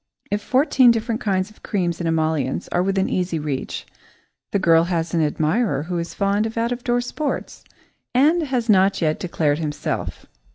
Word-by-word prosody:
If 205 +1 0
fourteen 260 +1 +4
different 230 0 0
kinds 190 -1 0
of 215 - -22
creams 175 -4 -1
and 170 - -1
emollients 155 -4 0
are 175 - +1
within 195 +1 +1
easy 180 -2 -1
reach, 150 -3 -4 0.6
the - - +1
girl 165 -3 +4
has 170 -2 -2
an 165 - +2
admirer 155 - +1
who 175 +1 -3
is 170 - -5
fond 200 +2 +1
of 225 - -8
out 230 +1 0
door 245 0 +1
sports 285 +4 -4 0.5
and 300 +7 +4
has 260 -6 -1
not 195 -2 +4
yet 155 -2 0
declared 155 -4 0
himself. 150 -2 -4
185 Hz, 170 wpm, -22 LUFS, 160-230 Hz, 0.6 s, fourteen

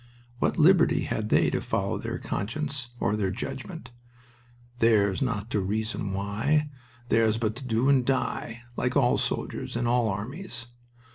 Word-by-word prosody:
What - - +1
liberty 170 +2 +5
had 110 0 -2
they - - +4
to - - -1
follow - - -1
their - - -4
conscience 130 +4 -3
or 105 - +1
their 100 -3 0
judgment 95 - -6 0.9
"Theirs 105 -5 +3
not 115 -4 -2
to 105 - +1
reason 105 +1 -2
why, 115 +10 0 0.4
theirs 110 -1 +3
but 110 -1 -1
to 135 - -8
do 120 +1 +1
and 135 -2 +5
die" 120 -2 -1
like 125 +4 0
all 125 -3 +3
soldiers - - -2
in 120 +1 0
all 120 -1 +2
armies. 115 - -5
115 Hz, 150 wpm, -27 LUFS, 105-135 Hz, 0.9 s, liberty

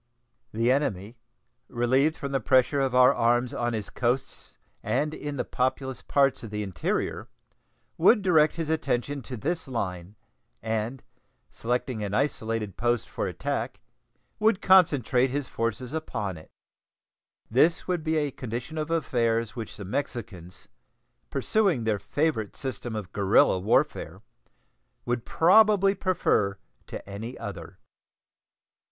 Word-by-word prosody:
The 115 +3 +1
enemy, 115 -5 -1 0.5
relieved 130 +6 +2
from 140 -2 -5
the 135 - +1
pressure 130 +2 +3
of 130 -2 0
our 125 0 +7
arms 120 +2 +1
on 120 -3 -1
his 110 -3 -4
coasts 125 +2 -2 0.2
and 150 +1 -1
in 145 -2 -5
the - - -1
populous 130 0 -2
parts 140 -2 +2
of 115 - -7
the 105 0 -3
interior, 95 -5 -2 0.7
would 205 +5 +5
direct 155 -5 +4
his 160 -2 -2
attention 140 -2 -1
to 125 +1 -7
this 160 +7 -2
line, 95 -6 -4 0.4
and, 110 +3 -3 0.5
selecting 120 -1 -2
an 100 0 -2
isolated 115 -6 -1
post 120 -1 0
for - - -3
attack, - - -3 0.6
would 215 -2 +3
concentrate 140 - +4
his 140 +1 -3
forces 115 +3 -3
upon 115 - -3
it. 80 - -13 1.0
This 155 +8 +3
would 180 -3 -1
be 160 0 0
a 145 -2 0
condition 125 +6 -5
of 155 +1 -3
affairs 115 -8 0
which 115 -4 -7
the 100 - -7
Mexicans, 100 -6 -5 0.6
pursuing 195 - +1
their 110 -2 0
favorite 110 +2 -1
system 120 -3 -4
of 100 -4 -5
guerrilla 100 -2 +4
warfare, 100 +5 0 0.8
would 120 -1 -2
probably 195 +2 +5
prefer 175 - +1 0.3
to - - -8
any 110 +5 -7
other. 100 -6 -8
125 Hz, 130 wpm, -27 LUFS, 110-150 Hz, 1.0 s, our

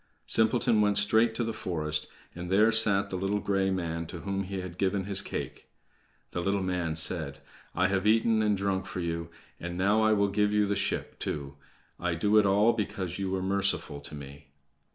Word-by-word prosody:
Simpleton 115 0 +3
went 105 -1 +2
straight 110 +2 +3
to 120 - -1
the 115 0 -3
forest, 75 -5 -2 0.3
and 90 +1 -7
there 105 +4 +4
sat 105 -3 +3
the - - -3
little 95 +3 -1
gray 95 -1 0
man 85 -3 -3
to 85 0 -8
whom 100 0 -2
he 95 +1 -5
had 90 -1 -9
given 95 0 0
his 100 0 +2
cake. - - -6 0.6
The 85 - -3
little 100 +1 0
man 90 -3 -2
said: 80 -1 0 0.4
"I 90 - +2
have 95 +1 0
eaten 110 0 +3
and 105 -2 +1
drunk 95 -1 -1
for - - -5
you, 85 -1 -3 0.3
and 85 +1 -5
now 100 +4 +2
I 110 0 +4
will 100 -1 +2
give 105 +1 +1
you 105 0 +2
the 100 0 -1
ship, 100 - -2
too. 70 -1 -5 0.4
I 90 -1 -1
do 105 +6 +2
it 105 - +3
all 105 +4 +4
because 95 -3 -4
you 95 -1 -2
were 95 0 -2
merciful 95 -6 0
to 70 - -9
me." 70 +1 -11
95 Hz, 200 wpm, -28 LUFS, 90-105 Hz, 0.6 s, there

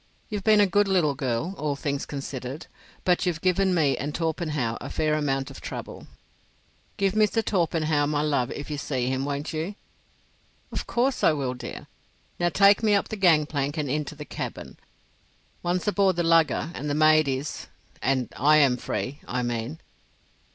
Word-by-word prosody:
You've 210 -2 -4
been 215 0 +5
a 205 - +6
good 205 +2 +2
little 175 -7 +2
girl, 135 +5 -2
all 150 -2 -1
things 140 0 -3
considered, 135 0 -6 0.4
but 180 0 +2
you've 170 -2 0
given 185 +1 +2
me 145 -5 +3
and 145 +4 -4
Torpenhow 155 -8 -1
a - - -6
fair 155 -1 0
amount 135 -3 -1
of - - -11
trouble." - - -7 0.9
"Give 195 -1 +1
Mr. 215 +1 +2
Torpenhow 160 -5 +1
my 150 0 0
love 140 -5 +1
if 145 +1 -6
you 145 - -3
see 130 -4 -2
him, 130 +1 -1
won't 145 +2 -3
you?" 165 +6 -3 1.0
"Of - - -4
course 255 +3 0
I 160 - +5
will, 135 -4 -2
dear. 125 -1 -8 0.5
Now 175 0 +2
take 200 +6 +5
me 215 -2 +4
up 200 - 0
the - - -3
gang 170 -7 +4
plank 145 -1 -2
and 145 -4 -1
into 150 +1 -2
the 150 0 -8
cabin. - - -6 0.8
Once 175 +1 -1
aboard 200 -3 +3
the 175 - 0
lugger 165 0 +3
and 150 +2 -4
the 145 - 0
maid 155 0 +5
is—and 130 -2 -3
I 150 +3 +5
am 135 -4 +4
free, 135 +3 -4
I 125 0 -1
mean." 120 +5 -3
150 Hz, 175 wpm, -26 LUFS, 140-180 Hz, 1.0 s, a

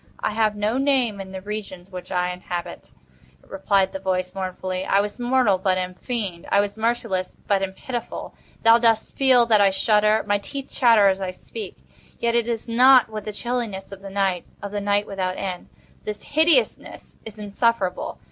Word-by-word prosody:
"I - - 0
have 215 -1 +1
no 210 +5 0
name 255 -7 +1
in 190 -1 -9
the 190 -1 -7
regions 195 -3 -7
which 180 0 -8
I 180 -1 0
inhabit," 175 -1 -6 0.5
replied 195 0 0
the 190 - -4
voice, 185 -1 -2
mournfully; 185 -1 -4
"I 195 - +2
was 205 +3 -3
mortal, 245 -6 +2
but 185 0 +1
am 185 0 -3
fiend. 195 -5 -4
I 200 - +5
was 205 0 0
merciless, 220 -5 -1
but 200 -1 +1
am 190 -1 -2
pitiful. 240 +3 -6 0.3
Thou 230 +1 +7
dost 225 -2 +1
feel 260 -3 +5
that 220 -3 +4
I 200 - +6
shudder. 210 +2 +2
My 205 0 +1
teeth 275 +6 -7
chatter 230 -5 +5
as 190 0 -1
I 190 - -2
speak, 425 - -9 0.3
yet 235 0 0
it 235 -1 +1
is 230 -1 -3
not 250 +2 +6
with 215 -1 -6
the 215 - -3
chilliness 225 -4 -4
of 195 -1 -10
the 195 - -8
night—of 195 0 -3
the 205 0 -3
night 205 0 +1
without 185 -2 -3
end. 185 -2 -5 0.3
But - - -33
this 210 -1 -5
hideousness 320 +9 +1
is 220 -1 -10
insufferable. 205 -2 -1
205 Hz, 185 wpm, -23 LUFS, 190-230 Hz, 0.5 s, Thou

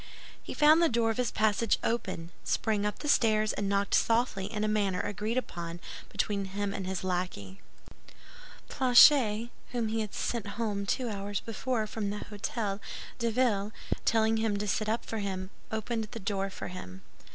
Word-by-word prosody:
He - - -7
found 310 +2 +6
the 335 - +5
door 230 -1 +2
of 220 - -4
his 250 -2 +1
passage 215 0 +2
open, 185 -7 -2
sprang 210 -2 0
up 210 - -3
the 295 - -6
stairs 215 -6 +3
and 200 -1 -2
knocked 200 0 +1
softly 225 -4 +2
in 210 -2 -2
a - - +2
manner 200 -3 +1
agreed 210 +3 -2
upon 170 -8 -4 0.3
between 200 -2 -1
him 200 +1 -3
and 190 -2 -4
his 190 -1 -3
lackey. 175 - -3 1.1
Planchet*, 245 -3 +6 0.2
whom 235 -3 0
he 225 0 0
had 210 -2 -5
sent 230 -4 -2
home 205 -3 -1
two 255 +3 0
hours 200 -2 -3
before 230 0 -2
from 210 -1 -3
the 205 - -3
Hôtel 205 -1 -2 0.4
de 235 -1 +1
Ville, 215 -4 +1 0.3
telling 225 0 +3
him 220 -2 +1
to 210 +1 -2
sit 215 +2 0
up 225 +2 -1
for 225 - -3
him, 190 -1 -3 0.2
opened 220 +1 -2
the 220 +2 -8
door 195 -1 -1
for 190 - -7
him. 95 - -9
210 Hz, 175 wpm, -30 LUFS, 195-230 Hz, 1.1 s, found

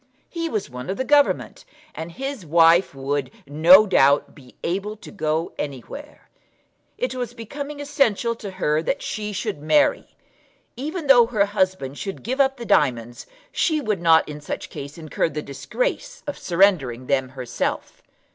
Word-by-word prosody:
He 335 -1 -3
was 215 -7 -2
one 125 +1 -8
of 190 - -2
the 260 - -1
Government, 290 +1 +2 0.3
and 160 +1 -7
his 270 +1 -5
wife 165 +1 +4
would, 135 0 -2 0.2
no 170 +8 +7
doubt, 140 -7 +3
be 130 -4 -17
able 200 +5 -2
to - - -12
go 160 -3 -2
anywhere. 150 - -7 0.7
It - - -2
was 245 -2 -5
becoming 285 +6 -7
essential 275 -6 +1
to 205 - -7
her 155 -5 0
that 270 - -2
she 210 -1 -4
should 170 -6 -4
marry. 285 - +2 0.6
Even 305 +6 -5
though 245 -4 +7
her 215 -4 +2
husband 185 -9 -1
should 195 -1 -6
give 260 +5 0
up 270 0 +2
the 235 - -7
diamonds, 120 - +1 0.2
she 315 -3 +1
would 215 - -2
not 165 -1 +5
in 150 0 -8
such 145 - -6
case 140 +3 -8
incur 160 0 -1
the 150 0 -5
disgrace - - -4
of 290 - -4
surrendering 170 -10 +2
them 130 -1 0
herself. 125 -2 -3
190 Hz, 160 wpm, -23 LUFS, -, 0.7 s, no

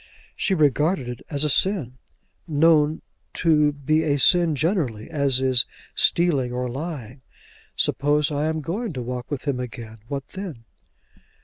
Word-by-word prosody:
She 195 - 0
regarded 150 0 +1
it 125 -1 -6
as 145 -1 -1
a 150 - +2
sin, 140 - +1 0.5
known 155 0 +3 0.3
to 150 -3 +3
be 150 +2 0
a 145 -3 +1
sin 170 +2 +5
generally, 145 - -1
as 140 -4 +1
is 130 -2 +3 0.3
stealing 145 -8 +2
or 125 0 -2
lying. 135 -2 -6 0.5
"Suppose 150 +2 +1
I 150 +1 -1
am 160 0 -2
going 195 - -4
to 125 -3 -5
walk 125 0 -5
with 145 -1 -5
him 135 -3 0
again? 115 -3 -8
what 140 0 -5
then?" 180 -12 -8
145 Hz, 145 wpm, -23 LUFS, 125-160 Hz, 0.5 s, sin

